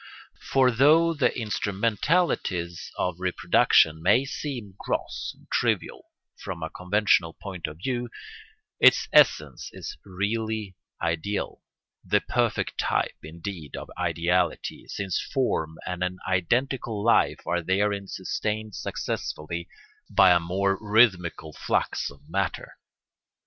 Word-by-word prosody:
For 130 -2 +3
though 155 +7 +5
the 150 -5 +2
instrumentalities 105 - 0
of 90 -1 -1
reproduction 80 -3 +3
may 105 +10 +4
seem 125 -8 -5
gross - - -3
and - - -23
trivial - - 0 0.3
from 85 -3 -6
a 80 - -4
conventional 90 -3 +2
point 90 -5 -6
of 75 0 -9
view, 120 +5 -3 0.7
its - - +6
essence - - +4
is - - -7
really 105 +1 -3 0.2
ideal, 85 +5 -2 0.4
the - - +2
perfect - - -1
type, - - 0
indeed, 80 -1 -7
of - - -8
ideality, 85 +1 0
since 95 -3 -2
form 80 - -1
and 90 0 -3
an 90 0 -2
identical 115 +4 0
life 115 - +3
are 85 0 0
therein 100 +2 0
sustained 105 +3 -3
successfully 85 0 -4 0.4
by 95 - +6
a 90 - +6
more 95 +3 0
rhythmical 95 -7 +2
flux - - -1
of 70 +1 -17
matter. 95 +1 -2
95 Hz, 115 wpm, -26 LUFS, 85-110 Hz, 0.7 s, its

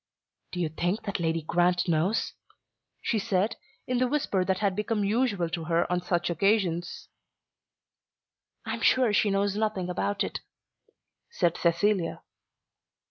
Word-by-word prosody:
"Do 180 - -5
you 170 -3 0
think 175 +7 -2
that 200 -4 -3
Lady 165 -1 0
Grant 175 +3 +2
knows?" 170 +6 +1 0.7
she 225 - +1
said, 200 0 0 0.3
in 250 -1 0
the 255 - +3
whisper 245 -9 0
that 190 0 0
had 200 -2 0
become 210 0 -1
usual 205 -4 +1
to 165 -1 -4
her 170 +1 +2
on 180 0 +1
such 175 -1 0
occasions. 175 -1 0 1.6
"I - - -3
am - - -5
sure 250 -5 +4
she 205 - +3
knows 200 0 +1
nothing 210 -4 -1
about 205 +3 -1
it," - - -4 0.9
said 175 - +1
Cecilia. 175 +1 +1
190 Hz, 140 wpm, -27 LUFS, 175-210 Hz, 1.6 s, sure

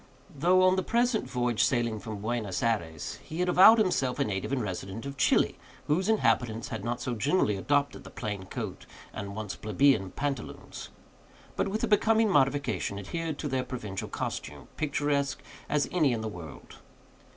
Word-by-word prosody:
Though 180 +6 +4
on 185 0 +4
the - - +2
present 235 +2 +1
voyage 120 -3 +1
sailing 120 -3 +1
from 105 -1 -7
Buenos 110 -4 -2
Ayres, 85 -10 -2
he 160 - -7
had 180 - +1
avowed 190 +6 +8
himself 160 - +1
a - - +2
native 95 +3 -3
and 135 - +1
resident 95 +3 -5
of 140 0 -5
Chili, 130 -2 +2 0.3
whose 185 +7 +1
inhabitants 120 - +1
had 110 -3 -5
not 120 +1 -2
so 125 - -3
generally 120 - +1
adopted 145 +8 0
the - - -10
plain 105 -4 -5
coat - - -6 0.3
and 100 0 -6
once 105 -2 -4
plebeian 110 -2 +2
pantaloons; 140 +5 -5 0.7
but, - - 0
with 210 +3 -2
a - - +2
becoming 220 0 +3
modification, 135 - +1
adhered 155 - -4
to 150 - -3
their 130 -2 0
provincial 105 -8 -5
costume, - - -5
picturesque 145 -2 -1 0.3
as 150 -1 +1
any 155 -8 +3
in 115 - -2
the 110 - -3
world. 85 -8 -9
130 Hz, 170 wpm, -29 LUFS, 110-155 Hz, 0.7 s, avowed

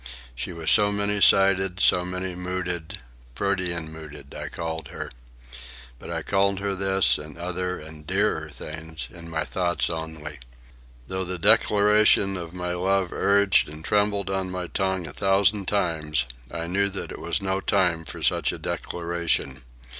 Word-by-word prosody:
She - - -5
was 85 -2 0
so 105 -1 +6
many 105 0 0
sided, 95 -2 +4
so 90 - +4
many 90 +1 -4
mooded—"protean 85 -1 -4
mooded" 75 -3 -11
I - - -6
called 80 -2 -5
her. - - -7 0.9
But - - -10
I - - -3
called 100 0 +1
her 100 0 -2
this, 95 0 +3
and 75 +2 -9
other 90 +1 -3
and 75 -1 -10
dearer 95 -5 0
things, 80 -2 -7
in 85 +1 -10
my 80 -1 -2
thoughts 85 +8 -1
only. 80 -3 -6 0.7
Though 95 0 -2
the 90 0 -4
declaration 105 +2 +5
of 85 -3 -6
my 90 0 -4
love 95 0 0
urged 100 -3 +3
and 75 +1 -10
trembled 100 -2 +1
on 95 -1 -1
my 90 -1 -4
tongue 95 0 -1
a 70 - -8
thousand 100 0 +2
times, 80 -8 0 0.2
I 85 -1 -4
knew 100 +3 +1
that 100 - -4
it - - -8
was - - -1
no 95 -1 -1
time 90 -6 +1
for 75 - -8
such - - +3
a - - -6
declaration. 85 -4 -2
90 Hz, 155 wpm, -25 LUFS, 80-95 Hz, 0.9 s, so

